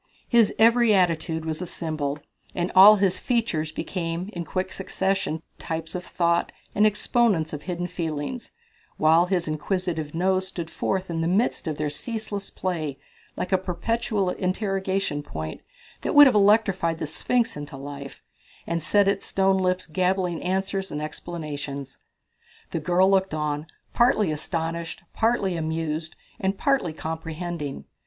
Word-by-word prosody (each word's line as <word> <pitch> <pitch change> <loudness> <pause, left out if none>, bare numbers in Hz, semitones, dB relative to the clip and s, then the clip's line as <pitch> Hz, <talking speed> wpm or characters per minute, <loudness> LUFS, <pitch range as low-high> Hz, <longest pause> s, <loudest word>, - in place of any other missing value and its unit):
His 235 -3 +5
every 230 -1 +5
attitude 165 -3 +1
was 160 +1 -3
a 180 - -3
symbol, 155 -4 -3 0.4
and 175 0 -1
all 195 +3 +10
his 195 -3 +1
features 225 -11 0
became 170 +3 -3
in 175 -2 -3
quick 185 +2 -2
succession 190 -4 -1 0.2
types 160 0 -4
of 180 - -4
thought 170 -1 +1 0.2
and 210 +1 +5
exponents 210 -6 +1
of 150 - -4
hidden 175 +1 -3
feelings, 165 - -4 0.5
while 165 +3 +5
his 180 -3 0
inquisitive 160 0 -2
nose 185 +2 +1
stood 170 -3 -6
forth 185 +1 -2
in 165 -1 -1
the 165 - 0
midst 195 0 +1
of 155 -2 -2
their 150 -1 -1
ceaseless 210 +3 -4
play 155 -7 -3 0.4
like 185 - -3
a 190 - +4
perpetual 195 +2 -1
interrogation 190 -4 -1
point 80 - -6 0.4
that - - -2
would 290 0 +11
have 265 - +5
electrified 200 -5 +3
the 155 - -3
Sphinx 235 +9 0
into 145 -1 -7
life, 140 0 -8 0.4
and 170 0 -1
set 200 +6 +3
its 200 - 0
stone 190 0 +2
lips 185 0 0
gabbling 180 +1 0
answers 190 +1 -1
and 150 - -4
explanations. 150 -4 -6 0.7
The - - -1
girl 180 +4 +3
looked 190 -3 +2
on, 150 0 -2 0.3
partly 215 -7 +3
astonished, 165 +2 -3
partly 220 -5 +1
amused, 160 -1 -2 0.2
and 195 -2 0
partly 275 - +1
comprehending. 160 -1 -5
175 Hz, 145 wpm, -25 LUFS, 160-195 Hz, 0.7 s, would